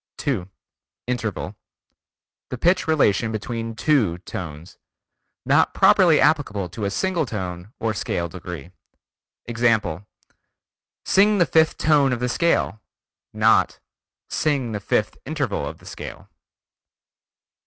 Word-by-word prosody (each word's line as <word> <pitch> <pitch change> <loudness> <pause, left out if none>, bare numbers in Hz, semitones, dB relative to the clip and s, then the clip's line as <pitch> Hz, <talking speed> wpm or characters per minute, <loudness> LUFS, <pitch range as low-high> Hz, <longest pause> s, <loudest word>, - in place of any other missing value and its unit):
2. 110 - -2 0.6
Interval: 120 -5 -3 0.9
The 125 - -4
pitch 175 +8 +2
relation 115 -8 +2
between 115 +1 -4
two 110 - +2
tones. 85 -2 -8 0.7
Not - - +3
properly - - +5
applicable 100 -3 +1
to 105 +2 -5
a - - 0
single 170 - -1
tone 95 -2 -5
or 115 -1 -1
scale 85 -3 -2
degree. 85 -1 -8 0.7
Example: 110 -6 0 1.0
"Sing 205 +2 +4
the 175 - +4
fifth 160 0 +3
tone 145 -4 +3
of 120 - -2
the 125 0 -1
scale." 145 -7 +1 0.5
Not - - +3 0.5
"sing 140 -6 0
the 105 - -3
fifth 105 +1 -1
interval 130 - -2
of - - -7
the - - -19
scale." - - -9
115 Hz, 115 wpm, -23 LUFS, 95-145 Hz, 1.0 s, properly